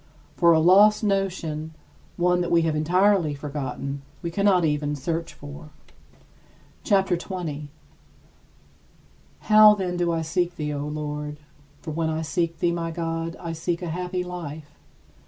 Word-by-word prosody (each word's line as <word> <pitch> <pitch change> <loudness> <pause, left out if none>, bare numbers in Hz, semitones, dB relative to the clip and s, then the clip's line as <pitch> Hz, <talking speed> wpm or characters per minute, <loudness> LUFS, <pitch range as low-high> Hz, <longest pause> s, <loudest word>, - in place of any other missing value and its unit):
For 170 -1 +5
a 160 - +5
lost 205 +6 +6
notion, 175 -6 -2 0.4
one 180 0 +2
that 175 - -2
we 170 -1 +3
have 160 -1 0
entirely 175 0 +2
forgotten, 140 -1 -5 0.2
we 170 - -3
cannot 190 -1 +3
even 150 -1 0
search 165 +4 -4
for. 145 +2 -10 1.1
CHAPTER 195 -4 +2
XX - - -5
29. 155 -6 -5 1.7
How, 215 0 +7
then, 180 -3 -3
do 175 -1 +1
I 165 -1 -1
seek 175 +2 -1
thee, 150 -2 -3
O 145 0 -3
Lord? 150 0 -4 0.5
For 155 - -5
when 160 +1 -1
I 160 0 -2
seek 165 +1 -1
thee, 170 - +1
my 170 -1 -2
God, 165 0 -3
I 170 -2 -5
seek 170 +2 -3
a 175 - -3
happy 180 +2 -3
life. 160 -4 -7
165 Hz, 150 wpm, -24 LUFS, 150-180 Hz, 1.7 s, How